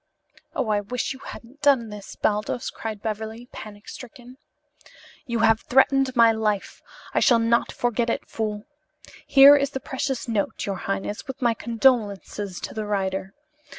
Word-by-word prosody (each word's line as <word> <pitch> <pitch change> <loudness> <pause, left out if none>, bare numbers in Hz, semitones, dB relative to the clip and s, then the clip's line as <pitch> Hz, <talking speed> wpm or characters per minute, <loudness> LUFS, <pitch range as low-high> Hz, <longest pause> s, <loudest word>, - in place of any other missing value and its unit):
"Oh, 220 - -1
I 205 -1 +2
wish 245 +5 -3
you 265 - -13
hadn't 265 +2 -11
done 270 -6 +3
this, 210 -1 -9
Baldos," 210 +4 -1
cried 215 -2 -6
Beverly, 220 +2 -5
panic 205 -1 -10
stricken. 250 0 -11 0.9
"You 235 -1 -1
have 225 0 +4
threatened 270 0 +3
my 230 -1 +6
life. 215 -3 -2 0.3
I - - +3
shall 240 - +5
not 230 +1 +2
forget 240 -1 -1
it, - - -2
fool. 210 -2 -3 0.6
Here 280 +1 +9
is 280 -1 +1
the 265 - -5
precious 265 -1 -3
note, 215 -4 -1
your 195 -2 -3
highness, 195 +4 -3
with 265 0 -6
my 240 -2 +2
condolences 215 -5 0
to - - -6
the 215 -1 -4
writer." 195 -1 -2
230 Hz, 155 wpm, -24 LUFS, 210-255 Hz, 0.9 s, Here